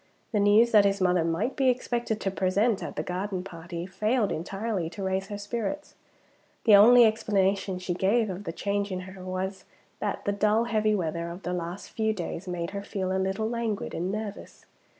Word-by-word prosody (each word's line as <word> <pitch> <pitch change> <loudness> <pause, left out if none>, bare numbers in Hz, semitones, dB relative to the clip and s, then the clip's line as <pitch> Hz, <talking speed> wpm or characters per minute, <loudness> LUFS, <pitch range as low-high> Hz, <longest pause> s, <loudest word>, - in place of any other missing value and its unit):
The 215 - +1
news 210 +4 +5
that 210 -2 +7
his 200 0 +1
mother 180 -2 +3
might 165 +10 -1
be 265 -1 +3
expected 240 -3 -1
to 195 - -1
be - - -14
present 200 +3 +1
at - - -6
the - - -2
garden 185 +1 -3
party 170 -2 -7
failed 210 +4 0
entirely 195 +1 -3
to 180 +4 -7
raise 190 0 -1
her 205 - -5
spirits. 235 +8 -4 0.7
The 215 -3 +7
only 235 +4 +8
explanation 200 -3 +1
she 180 0 -3
gave 210 +6 +2
of 190 +1 -6
the 165 - -3
change 200 +3 -2
in 185 0 -3
her 190 0 -10
was, 190 +1 -4 0.4
that 210 - -3
the 205 - +2
dull 210 +2 +2
heavy 215 -2 +1
weather 170 -2 -2
of 175 +3 -9
the 180 - -2
last 175 +2 -5
few 220 -1 0
days 180 -1 -5
made 170 -1 -3
her 200 0 -4
feel 190 -2 -3
a 190 - +1
little 195 +3 -1
languid 230 -3 -2
and 180 +3 -2
nervous. 210 0 -6
200 Hz, 200 wpm, -27 LUFS, 185-215 Hz, 0.7 s, only